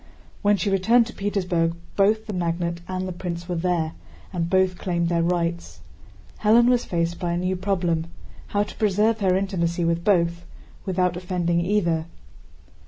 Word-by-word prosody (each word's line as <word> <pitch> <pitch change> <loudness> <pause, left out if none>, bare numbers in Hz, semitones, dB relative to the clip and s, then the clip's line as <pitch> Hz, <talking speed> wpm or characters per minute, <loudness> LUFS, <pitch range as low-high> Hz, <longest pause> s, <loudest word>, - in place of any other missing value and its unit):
When 205 -1 +3
she 200 0 -1
returned 225 +5 +4
to 235 - -9
Petersburg 180 -5 0 0.2
both 215 +2 +3
the 215 - -5
magnate 170 -1 -2
and 185 0 -3
the - - -4
prince 170 -1 -5
were 180 - -2
there, 170 -2 0 0.4
and 170 -2 -1
both 185 -1 +2
claimed 170 -2 -1
their 170 -1 +1
rights. 170 0 -1 0.6
Hélène 230 +3 +5
was 245 -1 +2
faced 170 -1 -1
by 175 -2 -1
a - - 0
new 185 +1 0
problem—how 180 +1 -2
to - - -9
preserve 215 +2 +2
her 190 -2 +2
intimacy 175 -3 -1
with 170 0 0
both 170 -3 +2 0.4
without 180 -1 +1
offending 175 -1 0
either. 170 -5 +1
180 Hz, 160 wpm, -24 LUFS, 170-195 Hz, 0.6 s, Hélène